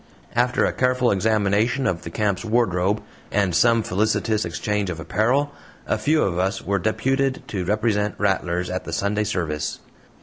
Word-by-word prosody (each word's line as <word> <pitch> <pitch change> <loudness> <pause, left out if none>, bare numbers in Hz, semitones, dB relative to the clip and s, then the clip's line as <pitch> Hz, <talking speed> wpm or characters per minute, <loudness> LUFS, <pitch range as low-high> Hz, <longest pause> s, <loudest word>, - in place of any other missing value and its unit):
After 125 +1 +2
a - - 0
careful 125 -1 +2
examination 110 +5 +1
of 85 -2 0
the - - -7
camp's 100 +2 -1
wardrobe, 105 -3 +1 0.3
and 100 -3 +1
some 115 +3 +4
felicitous 110 +2 0
exchange 100 +3 -2
of 80 -3 -4
apparel, 120 - +1 0.3
a - - 0
few 155 +1 +2
of 90 -2 -1
us 95 +2 0
were 100 0 -1
deputed 135 +6 0
to 95 -4 -2
represent 105 +1 0
"Rattlers" 90 -3 0
at 95 - -3
the 85 - -5
Sunday 100 +4 0
service. 80 -7 -2
105 Hz, 160 wpm, -23 LUFS, 95-115 Hz, 0.3 s, some